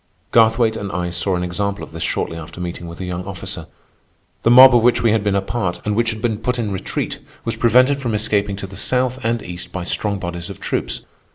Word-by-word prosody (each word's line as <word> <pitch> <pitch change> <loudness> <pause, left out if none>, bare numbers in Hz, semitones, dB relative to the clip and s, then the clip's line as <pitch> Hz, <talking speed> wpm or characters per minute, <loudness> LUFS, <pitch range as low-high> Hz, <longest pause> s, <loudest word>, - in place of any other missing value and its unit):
Garthwaite 115 0 +4
and 100 -3 -5
I 90 0 -2
saw 90 +2 0
an 90 - -1
example 100 +3 -2
of - - -9
this - - -7
shortly 80 - -1
after 80 +1 -9
meeting 85 -1 -5
with 85 0 -8
the 95 - -5
young 90 0 -4
officer. 95 -2 -6 0.7
The - - +3
mob 130 +1 +9
of 120 - +5
which 120 +1 +3
we 115 - +4
had 110 -2 +2
been 100 -1 +1
a 100 - +1
part, 95 -4 -2
and 105 -1 0
which 115 +1 +2
had 110 -1 -5
been 110 -3 0
put 125 +2 -1
in 110 -4 -2
retreat, 95 - -3 0.3
was - - -1
prevented 130 +4 +4
from 120 -5 -1
escaping 105 -1 0
to 100 - -6
the 95 +1 -10
south 130 +2 0
and 115 0 0
east 85 0 -7
by 95 - -4
strong 100 +3 0
bodies 85 -2 -5
of - - -8
troops. - - -2
105 Hz, 240 wpm, -20 LUFS, 90-115 Hz, 0.7 s, mob